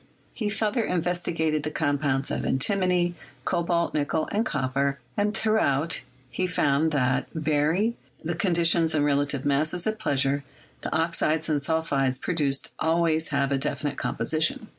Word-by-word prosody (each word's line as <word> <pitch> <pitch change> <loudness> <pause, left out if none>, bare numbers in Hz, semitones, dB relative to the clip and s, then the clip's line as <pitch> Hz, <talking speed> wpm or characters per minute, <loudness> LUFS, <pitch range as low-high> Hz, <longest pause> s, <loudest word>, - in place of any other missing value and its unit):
He 215 -4 -2
further 220 +2 0
investigated 170 -4 0
the 150 - -3
compounds 145 -3 0
of - - -2
antimony, 180 +4 +1 0.3
cobalt, 170 0 0
nickel, 155 +1 0
and 210 +2 +1
copper, 140 - -1 0.2
and 210 +1 0
throughout 165 -8 +1 0.3
he 185 - -1
found 155 -3 +2
that, 130 -3 +1
vary 155 +8 +1 0.3
the 170 +2 -1
conditions 170 -2 +2
and 145 -1 +2
relative 140 -1 +1
masses 155 +5 +1
at 220 0 -1
pleasure, 140 -6 0 0.4
the - - -4
oxides 160 -1 +1
and 150 -2 +2
sulphides 140 -4 0
produced 145 -6 -1
always 160 0 +2
have 140 -2 0
a 135 - +1
definite 145 0 -2
composition. 160 - 0
155 Hz, 140 wpm, -26 LUFS, 140-175 Hz, 0.4 s, found